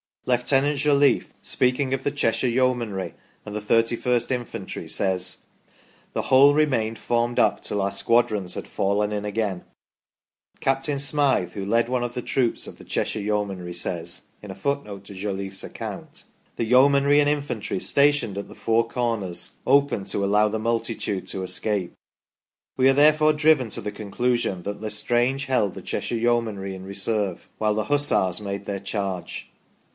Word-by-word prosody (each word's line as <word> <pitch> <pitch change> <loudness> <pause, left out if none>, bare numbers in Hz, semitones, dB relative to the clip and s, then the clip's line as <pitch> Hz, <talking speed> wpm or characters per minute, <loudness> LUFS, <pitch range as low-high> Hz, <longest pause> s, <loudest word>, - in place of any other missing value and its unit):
Lieutenant 135 +3 +2
Jolliffe, 145 -1 +3
speaking 130 +1 +2
of 135 - -2
the - - +1
Cheshire 115 -3 +1
Yeomanry 120 -6 0 0.3
and 105 -1 -7
the - - -1
31st 115 +3 +1
Infantry, 125 -2 -4
says: 95 -2 -1 0.7
"the - - -1
whole 140 +2 +6
remained 130 -7 +1
formed 120 +2 -1
up 105 - +3
till 105 - -2
our 100 0 0
squadrons 105 -2 +1
had - - -6
fallen 105 +2 0
in 105 0 -3
again 105 -3 -2 0.5
". - - -41
Captain 135 +1 0
Smyth, 140 - +2
who 100 -2 -4
led 115 +3 +2
one 125 -1 0
of 120 0 -3
the 125 - -2
troops 120 -1 0
of - - -9
the - - -13
Cheshire - - -1
Yeomanry, 100 -4 -2
says 85 -1 -2 0.2
(in 105 - -10
a 95 - -6
footnote 105 -4 -3
to 100 - -10
Jolliffe's 95 0 -4
account): - - -7 0.2
" - - -38
The 115 - -1
Yeomanry 140 +4 +5
and 145 0 +3
Infantry 130 -10 -2
stationed 140 -7 +2
at 100 - -5
the - - -13
four 115 0 +1
corners 115 -8 -2
opened 140 -7 +3
to 100 +1 -1
allow 105 +2 +3
the 110 +1 -2
multitude 115 -3 -2
to 95 - -4
escape". 95 0 -2 0.8
We 130 0 +5
are - - +5
therefore 155 +2 +5
driven 150 -5 +3
to - - -4
the 105 - -4
conclusion 105 -2 -1
that 100 +2 -4
1' 110 - -8
Estrange 120 +6 0
held 125 -8 +1
the - - -8
Cheshire - - -2
Yeomanry 110 -5 0
in 95 0 -9
reserve 100 -1 -2
while 105 -1 +1
the 110 -1 -1
Hussars 145 -11 +2
made 100 -1 -5
their 100 -1 -3
charge. 100 -2 -4
115 Hz, 165 wpm, -24 LUFS, 100-130 Hz, 0.8 s, whole